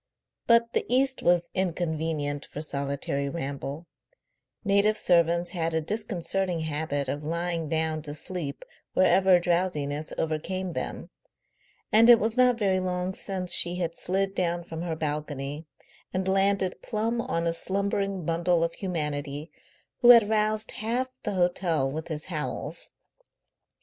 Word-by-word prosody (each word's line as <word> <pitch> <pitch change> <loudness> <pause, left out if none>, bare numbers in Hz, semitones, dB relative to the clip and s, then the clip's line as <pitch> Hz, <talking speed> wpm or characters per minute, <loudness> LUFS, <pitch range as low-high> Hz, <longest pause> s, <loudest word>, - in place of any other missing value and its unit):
But 235 0 +4
the - - +1
East 265 +2 +2
was 175 -1 +2
inconvenient 160 -5 -1
for - - -8
solitary 140 -1 -2
ramble; 140 +1 -5 0.8
native 200 +2 +3
servants 170 -1 +3
had 165 -3 -1
a - - +3
disconcerting 185 -1 -1
habit 150 -2 -2
of 145 +3 -3
lying 165 0 -2
down 160 0 0
to 150 -1 -4
sleep 155 -3 -4 0.3
wherever 185 0 +5
drowsiness 170 -4 -1
overcame 175 +4 -2
them, - - -5 0.8
and 225 +2 +6
it 240 - +10
was 220 +1 -1
not 250 -1 +4
very 195 -4 +2
long 180 0 -2
since 185 -2 -2
she 175 +1 +2
had 170 -2 -2
slid 195 +1 0
down 175 -2 -1
from 165 -1 -7
her 170 -2 -2
balcony 150 -1 -4 0.4
and 185 0 -2
landed 195 -1 +1
plumb 230 +1 -1
on 200 -10 -2
a 165 - +1
slumbering 195 0 -1
bundle 170 +1 +2
of 165 - -1
humanity 150 -4 -4 0.5
who 240 - +5
had 230 -4 +9
roused 215 0 +1
half 240 +4 -2
the 210 - -3
hotel 175 -6 +1
with 160 +3 -5
his 155 -2 -3
howls. 155 -5 -4
175 Hz, 140 wpm, -27 LUFS, 155-195 Hz, 0.8 s, it